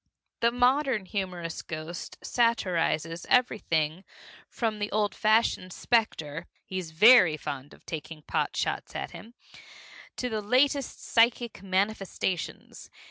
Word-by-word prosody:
The 235 Hz, -, +4 dB
modern 250 Hz, -2 st, +2 dB
humorous 180 Hz, -4 st, -4 dB
ghost 160 Hz, +2 st, -7 dB
satirizes 175 Hz, -8 st, 0 dB
everything 175 Hz, -9 st, +1 dB, 0.5 s
from 220 Hz, -3 st, -2 dB
the 205 Hz, 0 st, -3 dB
old 205 Hz, -2 st, +1 dB
fashioned 215 Hz, -4 st, +2 dB
specter 165 Hz, -9 st, 0 dB, 0.2 s
(he's 185 Hz, -3 st, -5 dB
very 180 Hz, -1 st, +7 dB
fond 145 Hz, -2 st, -6 dB
of -, -, -18 dB
taking 155 Hz, -1 st, -7 dB
pot -, -, -1 dB
shots -, -, -2 dB
at -, -, -4 dB
him) 235 Hz, +2 st, -12 dB, 0.8 s
to 250 Hz, -, -2 dB
the 220 Hz, -3 st, -2 dB
latest 265 Hz, +5 st, +1 dB
psychic 230 Hz, -3 st, +2 dB
manifestations. 190 Hz, -2 st, -2 dB
200 Hz, 115 wpm, -28 LUFS, 165-235 Hz, 0.8 s, very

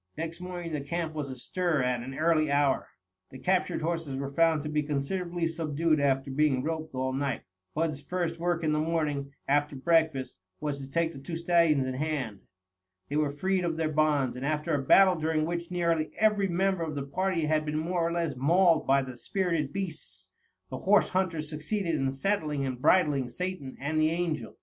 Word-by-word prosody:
Next 165 Hz, +2 st, -5 dB
morning 175 Hz, -2 st, -5 dB
the 150 Hz, -, -1 dB
camp 165 Hz, +2 st, -3 dB
was 150 Hz, -3 st, -4 dB
astir 150 Hz, +4 st, -1 dB
at 125 Hz, -1 st, 0 dB
an 135 Hz, +3 st, -7 dB
early 155 Hz, -1 st, +3 dB
hour. 140 Hz, -1 st, +2 dB, 0.4 s
The 130 Hz, -, -10 dB
captured 185 Hz, +1 st, 0 dB
horses 165 Hz, -4 st, -2 dB
were 140 Hz, +1 st, -4 dB
found 165 Hz, -1 st, +3 dB
to -, -, -4 dB
be 150 Hz, 0 st, 0 dB
considerably 170 Hz, +4 st, -2 dB
subdued 160 Hz, -1 st, 0 dB
after 135 Hz, -1 st, +1 dB
being 135 Hz, -2 st, +2 dB
roped 160 Hz, -2 st, -3 dB
all 130 Hz, 0 st, -1 dB
night. 135 Hz, -1 st, -2 dB, 0.3 s
Bud's 155 Hz, -2 st, -1 dB
first 170 Hz, +2 st, -2 dB
work 170 Hz, -1 st, 0 dB
in 155 Hz, -, +2 dB
the 150 Hz, -, +1 dB
morning, 150 Hz, -3 st, -1 dB, 0.2 s
after 145 Hz, +1 st, +2 dB
breakfast, 155 Hz, -, +1 dB, 0.2 s
was 145 Hz, -2 st, -3 dB
to 135 Hz, -1 st, -8 dB
take 165 Hz, +3 st, 0 dB
the 135 Hz, -, -9 dB
two 165 Hz, +5 st, -6 dB
stallions 165 Hz, -4 st, +3 dB
in 130 Hz, -, -2 dB
hand. 135 Hz, -7 st, -3 dB, 0.6 s
They 145 Hz, -, -3 dB
were 150 Hz, -1 st, +2 dB
freed 185 Hz, +5 st, 0 dB
of 165 Hz, -2 st, -1 dB
their 160 Hz, -1 st, 0 dB
bonds, 150 Hz, -4 st, +2 dB
and 125 Hz, -, -6 dB
after 155 Hz, +3 st, -1 dB
a 145 Hz, -, +1 dB
battle 185 Hz, +7 st, +6 dB
during 155 Hz, 0 st, 0 dB
which 170 Hz, 0 st, -3 dB
nearly 170 Hz, -3 st, 0 dB
every 210 Hz, -2 st, +3 dB
member 190 Hz, 0 st, +1 dB
of 155 Hz, -2 st, -3 dB
the 140 Hz, -, -2 dB
party 175 Hz, +3 st, -1 dB
had 155 Hz, 0 st, +2 dB
been 150 Hz, 0 st, -2 dB
more 170 Hz, +3 st, -1 dB
or 165 Hz, 0 st, +1 dB
less 170 Hz, -4 st, -1 dB
mauled 165 Hz, +5 st, +3 dB
by 135 Hz, 0 st, +4 dB
the 130 Hz, -1 st, -7 dB
spirited 165 Hz, +2 st, -1 dB
beasts, 145 Hz, -, -5 dB, 0.4 s
the 130 Hz, -, -4 dB
horse 205 Hz, +2 st, +4 dB
hunters 170 Hz, -5 st, -1 dB
succeeded 165 Hz, +4 st, -2 dB
in 135 Hz, -3 st, +1 dB
saddling 150 Hz, -1 st, -1 dB
and 130 Hz, -1 st, -4 dB
bridling 150 Hz, -5 st, +3 dB
Satan 180 Hz, -1 st, -5 dB
and 155 Hz, +3 st, 0 dB
the 155 Hz, -, +4 dB
Angel. 165 Hz, -2 st, -2 dB
155 Hz, 195 wpm, -29 LUFS, 140-170 Hz, 0.6 s, battle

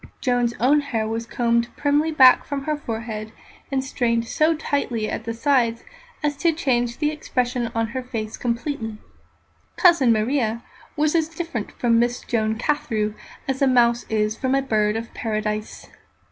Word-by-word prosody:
Joan's 245 Hz, -2 st, +1 dB
own 275 Hz, +5 st, +4 dB
hair 235 Hz, -7 st, -2 dB
was 225 Hz, +1 st, -3 dB
combed 235 Hz, 0 st, +1 dB
primly 295 Hz, +2 st, +2 dB
back 260 Hz, -4 st, +7 dB
from 280 Hz, -1 st, -4 dB
her 305 Hz, +2 st, -1 dB
forehead, 225 Hz, -5 st, -5 dB, 0.4 s
and 265 Hz, -1 st, 0 dB
strained 235 Hz, -3 st, 0 dB
so 315 Hz, +5 st, +2 dB
tightly 275 Hz, -8 st, -1 dB
at 225 Hz, -, -4 dB
the 230 Hz, -, -3 dB
sides 235 Hz, -3 st, +1 dB, 0.4 s
as 295 Hz, -1 st, +1 dB
to 335 Hz, +3 st, +3 dB
change 245 Hz, -6 st, 0 dB
the 300 Hz, 0 st, +1 dB
expression 250 Hz, -5 st, -1 dB
of 225 Hz, -1 st, -2 dB
her 260 Hz, +2 st, -3 dB
face 225 Hz, -4 st, -5 dB
completely. 235 Hz, -2 st, -3 dB, 0.8 s
"Cousin 340 Hz, -, +5 dB
Maria" 230 Hz, 0 st, 0 dB, 0.3 s
was 300 Hz, 0 st, +1 dB
as 325 Hz, -2 st, +1 dB
different 325 Hz, -9 st, -5 dB
from 230 Hz, -2 st, +2 dB
Miss 240 Hz, +1 st, 0 dB
Joan 220 Hz, -1 st, -1 dB
Carthew 220 Hz, -6 st, -1 dB, 0.3 s
as 270 Hz, 0 st, -2 dB
a 275 Hz, -, +5 dB
mouse 240 Hz, -2 st, +3 dB
is 215 Hz, 0 st, 0 dB
from 260 Hz, +3 st, 0 dB
a 275 Hz, -, +2 dB
bird 215 Hz, -4 st, +1 dB
of 230 Hz, +1 st, -5 dB
Paradise. 215 Hz, -1 st, -3 dB
240 Hz, 160 wpm, -23 LUFS, 225-285 Hz, 0.8 s, back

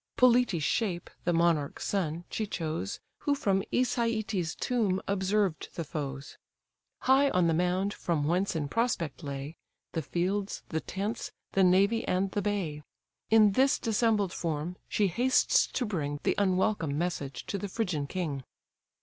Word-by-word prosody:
Polites' 245 Hz, -9 st, +4 dB
shape, 180 Hz, -1 st, -1 dB
the 175 Hz, -, +3 dB
monarch's 165 Hz, -4 st, +1 dB
son, 170 Hz, -4 st, -1 dB
she 215 Hz, -, -2 dB
chose, 155 Hz, -, -3 dB, 0.2 s
Who 285 Hz, -, +1 dB
from 195 Hz, -8 st, +1 dB
Æsetes' 220 Hz, -8 st, 0 dB
tomb 215 Hz, -7 st, +1 dB
observed 195 Hz, -2 st, 0 dB
the 170 Hz, -, -2 dB
foes, 140 Hz, -2 st, -6 dB, 0.6 s
High 270 Hz, +2 st, +5 dB
on 180 Hz, -6 st, +2 dB
the 165 Hz, -, +3 dB
mound; 180 Hz, +4 st, +1 dB
from 165 Hz, -4 st, -1 dB
whence 180 Hz, +5 st, +1 dB
in 150 Hz, -3 st, -1 dB
prospect 175 Hz, -, -1 dB
lay 140 Hz, +1 st, -6 dB, 0.3 s
The 165 Hz, -, -2 dB
fields, 190 Hz, +6 st, -2 dB
the 160 Hz, -, -1 dB
tents, 205 Hz, +4 st, -4 dB, 0.2 s
the 195 Hz, -, +3 dB
navy, 200 Hz, +5 st, +4 dB
and 190 Hz, +1 st, +1 dB
the 205 Hz, -, -1 dB
bay. 190 Hz, -8 st, -2 dB, 0.5 s
In 215 Hz, -2 st, +6 dB
this 265 Hz, +7 st, +3 dB
dissembled 215 Hz, -4 st, +1 dB
form, 165 Hz, +1 st, -3 dB
she 210 Hz, -, +2 dB
hastes 245 Hz, +8 st, +3 dB
to 250 Hz, -, -2 dB
bring 145 Hz, -8 st, -2 dB
The -, -, +2 dB
unwelcome 185 Hz, -6 st, +1 dB
message 145 Hz, -6 st, -3 dB
to 200 Hz, -, -3 dB
the 205 Hz, -, -3 dB
Phrygian 180 Hz, -9 st, -1 dB
king. 150 Hz, -6 st, -3 dB
185 Hz, 150 wpm, -29 LUFS, 160-210 Hz, 0.6 s, In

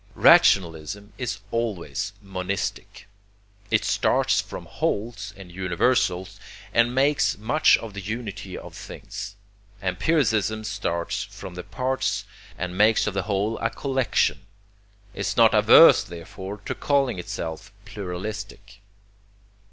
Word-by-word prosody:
Rationalism 90 Hz, +3 st, +4 dB
is 110 Hz, -6 st, -3 dB
always 105 Hz, -7 st, -2 dB
monistic. 95 Hz, 0 st, -4 dB, 0.6 s
It -, -, +2 dB
starts -, -, +2 dB
from -, -, -9 dB
wholes 100 Hz, -2 st, -3 dB
and 95 Hz, -3 st, -11 dB
universals, 95 Hz, +1 st, 0 dB, 0.3 s
and 120 Hz, +1 st, +3 dB
makes 140 Hz, +2 st, +2 dB
much 135 Hz, +9 st, +4 dB
of 115 Hz, -3 st, -8 dB
the 100 Hz, -, -6 dB
unity 110 Hz, +1 st, -5 dB
of -, -, -10 dB
things. 100 Hz, -1 st, -8 dB, 0.4 s
Empiricism 110 Hz, -, +1 dB
starts 85 Hz, -5 st, -2 dB
from 90 Hz, -, -10 dB
the 90 Hz, -, -6 dB
parts, 130 Hz, +7 st, -2 dB, 0.3 s
and 90 Hz, 0 st, -4 dB
makes 110 Hz, +3 st, +4 dB
of 105 Hz, -, -2 dB
the 100 Hz, -, 0 dB
whole 105 Hz, +3 st, 0 dB
a 115 Hz, -, 0 dB
collection 130 Hz, +1 st, 0 dB, 0.7 s
is -, -, -3 dB
not -, -, +6 dB
averse -, -, +8 dB
therefore 95 Hz, +4 st, -8 dB
to -, -, -2 dB
calling 135 Hz, -8 st, +1 dB
itself 85 Hz, +2 st, -6 dB
pluralistic. 100 Hz, +1 st, -7 dB
100 Hz, 115 wpm, -24 LUFS, 95-115 Hz, 0.7 s, averse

